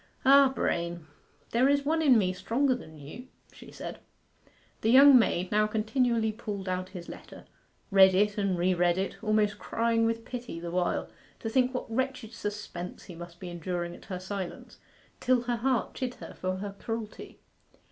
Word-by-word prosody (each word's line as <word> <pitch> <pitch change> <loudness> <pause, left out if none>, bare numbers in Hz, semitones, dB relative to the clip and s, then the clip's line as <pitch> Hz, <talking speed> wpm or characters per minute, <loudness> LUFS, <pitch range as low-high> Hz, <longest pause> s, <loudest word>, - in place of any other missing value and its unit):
'Ah, 275 0 +7
Brain, 170 -9 -2 0.5
there 250 +4 +3
is 285 0 +2
one 320 +2 +1
in 270 -6 +6
me 185 -3 +1
stronger 235 +9 +1
than 160 -11 -9
you!' 150 - -10 0.3
she - - -13
said. - - -7 0.8
The 220 - +1
young 275 +3 +9
maid 185 -5 0
now 215 0 +3
continually 220 +1 +1
pulled 205 -3 -6
out 185 0 -2
his 180 -3 -9
letter, - - -11 0.5
read 190 -1 +7
it 205 +2 +2
and 200 -3 0
re 180 +2 +2
read 175 0 +2
it, 195 +3 -3
almost 210 -1 +1
crying 230 0 +1
with 230 0 -2
pity 240 -9 -6
the 170 0 -6
while, 180 0 0 0.3
to 225 - -3
think 255 +1 +3
what 250 - -2
wretched 255 -2 -2
suspense 205 -4 -6
he 180 - -10
must 170 +1 -10
be 180 - -7
enduring 175 0 -4
at - - -15
her 185 -2 -5
silence, 190 -1 -6 0.4
till 255 -1 +2
her 240 0 -1
heart 255 +1 0
chid 250 -1 -4
her - - -10
for 185 0 -3
her 200 +1 -5
cruelty. 225 -2 -6
210 Hz, 175 wpm, -29 LUFS, 185-245 Hz, 0.8 s, young